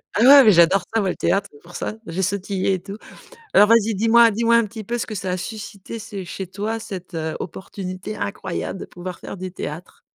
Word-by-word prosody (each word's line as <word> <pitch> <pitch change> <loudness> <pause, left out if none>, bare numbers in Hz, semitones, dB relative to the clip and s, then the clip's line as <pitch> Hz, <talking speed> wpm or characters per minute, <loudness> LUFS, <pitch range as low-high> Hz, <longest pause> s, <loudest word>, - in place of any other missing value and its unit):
Ah 210 - +2
ouais, 275 +2 +9
mais 220 - +7
j'adore 175 +1 +5
ça 225 - +2
moi 195 - 0
le - - -2
théâtre, 200 +1 0
c'est 145 - -17
pour 175 +1 -14
ça. 215 - -4
J'ai 170 +3 -3
sautillé 195 0 -1
et - - -5
tout. 200 +2 -8 0.6
Alors 205 - +7
vas-y, 225 -1 +4
dis-moi 230 +3 +5
dis-moi 235 +2 +3
un 235 - +4
petit 220 +2 -8
peu 235 +4 -3
ce - - -3
que 215 - -6
ça 190 -1 -3
a 180 - 0
suscité 210 +2 -7
ce 200 -3 -7
chez 190 +1 -6
toi 215 +4 -3
cette, 190 -5 -8
heu, 160 -1 -3
opportunité 190 +3 -6
incroyable 200 -2 -4
de - - -5
pouvoir 180 0 -8
faire - - -7
du 185 -1 -6
théâtre? 165 0 -7
200 Hz, 230 wpm, -22 LUFS, 185-220 Hz, 0.6 s, ouais